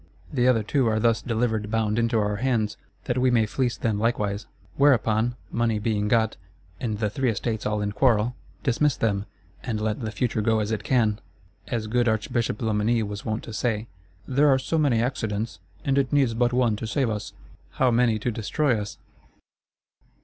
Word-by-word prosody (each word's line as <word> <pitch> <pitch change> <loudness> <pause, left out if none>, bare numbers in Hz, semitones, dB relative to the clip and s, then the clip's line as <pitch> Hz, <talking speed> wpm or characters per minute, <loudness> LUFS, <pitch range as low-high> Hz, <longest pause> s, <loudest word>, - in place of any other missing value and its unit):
The 125 -2 +2
other 115 -4 +3
two 130 +4 +1
are 110 -1 +2
thus 115 0 +2
delivered 110 -3 -1
bound 110 0 +1
into 115 0 +1
our 105 -1 0
hands, 115 -3 0 0.3
that 125 0 -1
we 130 0 +3
may 115 -3 +3
fleece 120 +2 -1
them 110 -3 -1
likewise. 105 -2 -1 0.3
Whereupon, 120 -4 +3 0.2
money 115 -2 +1
being 105 -1 0
got, 110 0 +2 0.4
and 110 -4 -2
the 105 0 0
Three 130 +5 0
Estates 110 0 -2
all 105 0 -1
in 105 - -1
quarrel, 120 +1 +2 0.3
dismiss 145 0 +2
them, 100 -2 0 0.4
and 110 -4 -2
let 110 0 -1
the 110 - -2
future 110 -1 -1
go 110 +1 +2
as 105 0 -2
it 110 - -2
can! 110 -5 +2 0.5
As 115 -3 -2
good 120 +2 +1
Archbishop 110 0 0
Loménie 110 +1 +1
was 105 0 -6
wont 110 0 -2
to 115 - -8
say: 110 -1 -1 0.4
'There 140 +3 +3
are 135 - +5
so 155 +5 -1
many 135 -7 +3
accidents; 110 -6 -2 0.3
and 140 0 +3
it 135 -2 0
needs 135 -5 +3
but 120 +1 +2
one 120 -3 +2
to 110 - -5
save 130 -1 0
us.'—How 105 - -3
many 115 -2 +3
to 120 +3 -2
destroy 115 +2 0
us? 105 - -7
115 Hz, 185 wpm, -25 LUFS, 105-125 Hz, 0.5 s, are